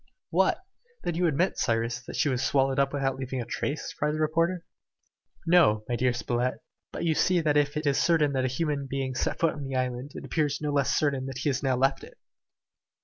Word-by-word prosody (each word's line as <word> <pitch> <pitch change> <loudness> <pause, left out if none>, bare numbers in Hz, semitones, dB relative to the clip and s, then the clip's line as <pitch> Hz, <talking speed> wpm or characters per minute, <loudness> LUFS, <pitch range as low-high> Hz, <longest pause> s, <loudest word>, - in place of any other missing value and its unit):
"What! 375 - +2 0.4
then 175 - -1
you 175 +2 +1
admit, 165 +5 0
Cyrus, 115 0 0
that - - -6
she 150 - +2
was 130 -3 0
swallowed 135 -1 +2
up 140 0 +2
without 135 -2 -1
leaving 130 0 -4
any 120 - -4
trace?" 140 +4 -3
cried 150 +1 -1
the - - -3
reporter. 165 +3 0 0.8
"No, 165 -12 +4
my 120 - -1
dear 125 +1 +2
Spilett, 120 +1 -1 0.4
but - - -5
you 165 - +3
see 180 +3 +2
that 155 -3 +1
if 145 0 +2
it 155 - -3
is 140 -2 +2
certain 155 -4 +3
that 130 -1 0
a - - +2
human 140 +1 -2
being 135 -1 -2
set - - -1
foot 165 -2 +2
on 145 - -7
the 135 -1 -4
island, 130 +2 -2
it - - -7
appears 145 -3 0
no 150 -1 -2
less 140 -2 +1
certain 140 -3 0
that 135 -1 -6
he 145 +3 0
has 135 -1 -1
now 135 -2 +1
left 135 +2 +1
it." - - -13
140 Hz, 225 wpm, -27 LUFS, 130-155 Hz, 0.8 s, No